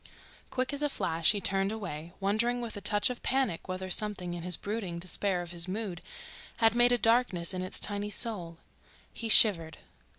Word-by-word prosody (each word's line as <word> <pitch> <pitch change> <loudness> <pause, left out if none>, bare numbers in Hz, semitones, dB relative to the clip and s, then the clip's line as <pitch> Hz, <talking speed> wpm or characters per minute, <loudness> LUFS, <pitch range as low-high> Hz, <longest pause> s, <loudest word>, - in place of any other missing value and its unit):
Quick 255 +2 -2
as 285 - -3
a 295 - +1
flash 165 - +1
he 210 - -2
turned 195 +1 0
away, 175 -7 -6
wondering 220 +5 0
with 235 -2 -6
a 205 - -7
touch 205 +4 +2
of 245 - -8
panic 260 -10 -1
whether 185 0 -5
something 190 -4 -1
in 175 -1 -7
the 180 -1 +1
brooding 200 -5 -4
despair 180 +1 -1
of 175 - -7
his 170 0 0
mood 190 -3 -5 0.6
had 225 -1 +3
made 240 +1 +4
a 245 - +3
darkness 225 -7 +2
in 185 - -3
its 185 - -4
tiny 205 0 -2
soul. 185 -6 -2 0.6
He 230 - -5
shivered. 165 -8 +6
200 Hz, 190 wpm, -29 LUFS, 175-225 Hz, 0.6 s, shivered